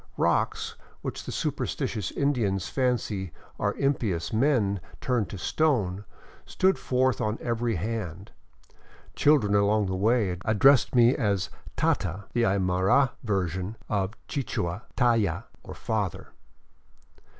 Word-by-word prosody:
Rocks, - - 0 0.3
which - - -5
the - - -5
superstitious 105 -7 -2
Indians 110 -10 0
fancy 115 -8 -1 0.3
are - - 0
impious 110 - -1
men 110 -5 +2 0.2
turned 120 -8 0
to 100 - -6
stone, 105 - 0 0.4
stood 190 +1 +1
forth 130 -2 +1
on 110 +1 -1
every 115 -1 -1
hand. 100 -1 -4 0.8
Children 140 -9 +4
along 105 +1 +3
the 95 0 -2
way 105 -2 +2
addressed 130 +6 +4
me 120 +1 +6
as 100 -6 0
" - - -16
tata," 95 +2 0
the 120 - +1
Aymara 95 +7 +3
version 95 -1 -2
of 100 -1 0
the 140 - -2
Ouichua 90 -5 -3
" - - -33
tayta 115 -9 +2 0.2
" - - -8
(father). 105 -6 -3
105 Hz, 125 wpm, -27 LUFS, 95-125 Hz, 0.8 s, me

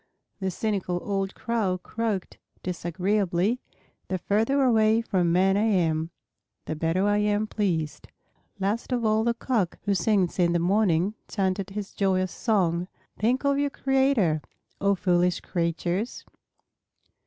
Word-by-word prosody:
The 190 -1 -1
cynical 190 -2 -2
old 195 -1 -2
Crow 220 -6 -1
croaked 210 0 -3 0.2
disagreeably, 185 +4 0 0.5
"The 185 - -1
further 225 +9 +1
away 220 -3 +4
from 180 -6 +1
men 190 +2 +3
I 210 +2 +2
am, 165 -6 +1 0.6
the 155 - -3
better 165 +5 0
I 205 0 +3
am 210 0 +1
pleased." 175 -8 -2 0.5
Last 205 +6 -2
of 240 -2 0
all 215 0 +3
the 235 0 +1
Cock 220 -9 -1
who 200 - +1
sings 190 -1 +1
in 170 -1 +3
the - - +3
morning 185 0 +2
chanted 190 -1 -1
his 200 0 -6
joyous 185 -2 +1
song, 180 -6 0 0.3
"Think 250 +6 +1
of 280 0 +2
your 285 0 +1
Creator, 265 - +2 0.4
O 200 0 +3
foolish 180 -1 +2
creatures!" 175 +5 -2
195 Hz, 135 wpm, -26 LUFS, 180-220 Hz, 0.6 s, away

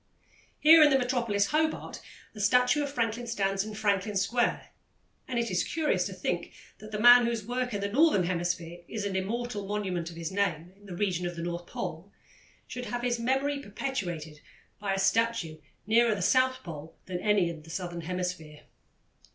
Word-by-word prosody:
Here 320 +1 +8
in 300 - +8
the 270 - +4
metropolis, 240 -6 0
Hobart, 315 +1 -1 0.3
a 215 - -11
statue 250 +7 +3
of 285 -1 -3
Franklin 235 -2 -2
stands 195 -4 0
in 215 0 -7
Franklin 205 -1 0
Square, 235 +5 0 0.6
and 250 - -3
it 235 -3 0
is 185 - +1
curious 300 - 0
to 195 - -7
think 180 -1 -3 0.3
that 215 +1 -11
the 210 - -3
man 245 +1 +8
whose 230 -3 -2
work 250 +2 -2
in 205 -2 -3
the 200 - 0
Northern 255 - +4
Hemisphere 175 -1 -2
is 215 -2 -4
an 195 -1 -2
immortal 210 +1 -3
monument 190 -5 -2
of 170 - -11
his 165 0 -5
name 180 -3 -1
in 205 +1 -18
the 180 - -7
region 180 -2 -1
of 175 - -6
the 170 - -5
North 175 0 -4
Pole 165 +6 -6 0.5
should 250 0 -6
have 245 0 -4
his 240 -1 0
memory 270 +4 0
perpetuated 175 - -5 0.4
by 200 -2 -1
a - - -3
statue 195 -4 +1 0.3
nearer 230 +1 +4
the 195 - -3
South 255 +4 +2
Pole 160 -2 -9
than 180 -1 -4
any 205 -2 +2
in 165 -2 -6
the 160 - -15
Southern 175 0 -4
Hemisphere. 175 -3 -4
205 Hz, 185 wpm, -29 LUFS, 180-240 Hz, 0.6 s, Here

